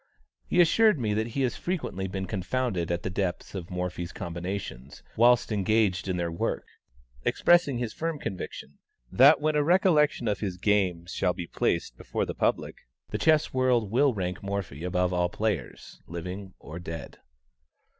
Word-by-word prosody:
He 180 - +1
assured 210 +4 +5
me 110 -4 0
that 110 +2 0
he 135 - +2
has 125 - 0
frequently 150 - -3
been 95 0 -4
confounded 95 -1 -2
at 85 0 -2
the - - -2
depth 95 -2 -3
of 90 -3 -6
Morphy's 90 -1 -4
combinations 85 -7 -6
whilst 120 +1 +4
engaged 105 -2 +1
in 90 -1 -1
their 85 -1 -1
work, 85 - -2 0.6
expressing 170 -7 +3
his 120 -3 -3
firm 165 -1 -2
conviction 90 - -7 0.3
that 140 +5 +7
when 155 +1 +1
a 155 +5 +4
collection 150 - +2
of 105 -2 0
his 95 -4 -3
games 90 -3 +1
shall 90 -2 +1
be 90 -2 -5
placed - - -1
before - - -2
the - - -4
public, - - -1 0.3
the - - -2
chess 155 -1 +3
world 125 -5 +2
will 135 +4 +4
rank 90 -5 -3
Morphy 100 -7 -4
above 90 0 0
all 90 0 +1
players, 105 - -3
living 90 +3 -6
or 80 +3 -9
dead. 80 -3 -7
100 Hz, 165 wpm, -27 LUFS, 90-125 Hz, 0.6 s, that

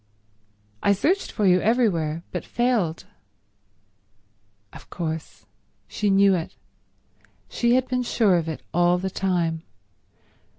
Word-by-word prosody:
"I 200 - +3
searched 355 - 0
for 215 - -1
you 180 -1 +4
everywhere, 175 -9 +1
but 180 - -4
failed—" 230 -9 -1 1.7
Of - - -13
course. 160 -2 -6 0.4
She 210 - -1
knew 195 0 +5
it. 170 -3 -3 0.9
She 240 0 +1
had 255 0 +1
been 250 -1 -1
sure 220 -6 +2
of 165 -1 -2
it 160 - -6
all 175 +1 +3
the 190 +1 -3
time. 175 -4 -1
190 Hz, 120 wpm, -24 LUFS, 170-230 Hz, 1.7 s, knew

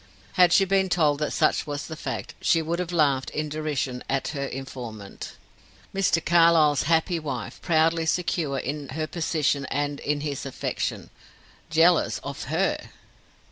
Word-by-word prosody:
Had 180 -1 +5
she 195 - +5
been 190 0 +2
told 150 -5 +2
that 150 - 0
such - - +1
was 145 -1 -4
the 160 - -6
fact, - - -5
she 165 - +3
would 170 +2 -2
have 180 -1 -3
laughed 140 -6 +2
in 155 0 -3
derision 145 -4 -3
at 135 -1 0
her 140 -2 -3
informant. 120 -7 -7 0.6
Mr. 190 -4 +1
Carlyle's 165 -4 +5
happy 165 +1 +2
wife, 135 -7 -5
proudly 165 0 +2
secure 160 -5 0
in 140 +1 -4
her 155 +3 -2
position 155 -4 0
and 145 0 -2
in 145 0 -1
his 145 -2 -3
affection, 135 - -4 0.6
jealous 165 +1 +4
of - - -6
her! - - -1
155 Hz, 150 wpm, -25 LUFS, 140-170 Hz, 0.6 s, Had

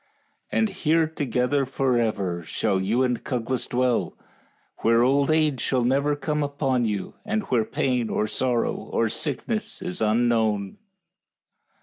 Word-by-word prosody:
And 220 -1 +2
here 165 -4 +2
together 140 -3 0
forever 115 -9 0
shall 95 +4 -1
you 115 +7 +1
and 125 -2 -1
Cuglas 125 -1 -2
dwell, 125 -1 0 0.6
where 115 +1 +4
old 140 +3 +3
age 155 -4 +2
shall 130 -2 +1
never 140 +4 +2
come 150 +1 -2
upon 140 -4 0
you, 105 -3 -3
and 220 0 -1
where 115 -3 +3
pain 125 -2 0
or - - 0
sorrow 120 +2 0
or 115 - -1
sickness 160 - -2
is 180 -5 -5
unknown." 110 - +1
125 Hz, 130 wpm, -25 LUFS, 115-145 Hz, 0.6 s, where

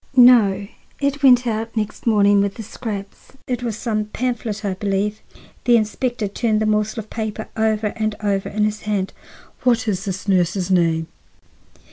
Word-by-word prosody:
"No, 220 -6 +6 0.3
it 280 0 -1
went 250 -3 +6
out 225 0 -3
next 215 +2 -3
morning, 205 -2 +5
with 200 0 -1
the 225 - -7
scraps. 205 -1 -7
It 250 -1 -2
was 230 -4 -3
some 215 -2 -1
pamphlet, 220 -2 -3
I 195 - 0
believe." 200 +2 -1 0.4
The 240 -2 +6
inspector 230 +1 -1
turned 215 +2 0
the 215 - +1
morsel 215 +1 0
of 215 - -18
paper 220 -1 -4
over 220 -1 0
and 215 -2 -1
over 200 -2 -1
in 210 0 0
his 215 0 -1
hand. 200 -3 -2 0.5
"What 240 -2 +2
is 195 -1 -1
this 190 0 -4
nurse's 185 0 +1
name?" 165 -3 +2
215 Hz, 165 wpm, -21 LUFS, 200-230 Hz, 0.5 s, No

